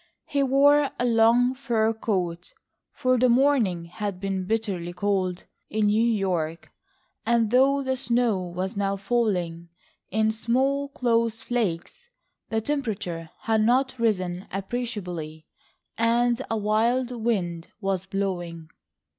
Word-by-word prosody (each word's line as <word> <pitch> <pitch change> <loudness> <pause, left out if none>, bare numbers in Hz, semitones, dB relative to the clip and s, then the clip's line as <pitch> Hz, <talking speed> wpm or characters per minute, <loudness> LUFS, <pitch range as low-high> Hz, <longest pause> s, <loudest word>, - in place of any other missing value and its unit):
He 285 -1 0
wore 280 +2 +4
a 245 - 0
long 235 +2 +4
fur 230 -4 0
coat, 180 -6 -3 0.4
for 255 -1 +1
the 255 +1 +4
morning 235 -9 +3
had 190 +2 -5
been 190 -1 -2
bitterly 195 -6 -2
cold 185 -2 -1 0.2
in 215 0 0
New 210 +2 +3
York, 185 -8 -1 0.5
and 230 -2 +2
though 275 +3 +4
the 260 0 0
snow 240 -5 +1
was 180 +2 -4
now 200 0 0
falling 190 -6 -1 0.4
in 220 +2 +2
small 265 +5 0
close 230 -4 0
flakes, 235 - -3 0.4
the 225 0 0
temperature 210 - -3
had 220 -1 +1
not 255 +3 +2
risen 185 -5 0
appreciably, 185 -7 -4 0.5
and 235 +1 +2
a 225 - 0
wild 230 +4 +1
wind 195 -8 -2
was 195 -2 -2
blowing. 175 -5 -3
220 Hz, 120 wpm, -25 LUFS, 185-245 Hz, 0.5 s, wore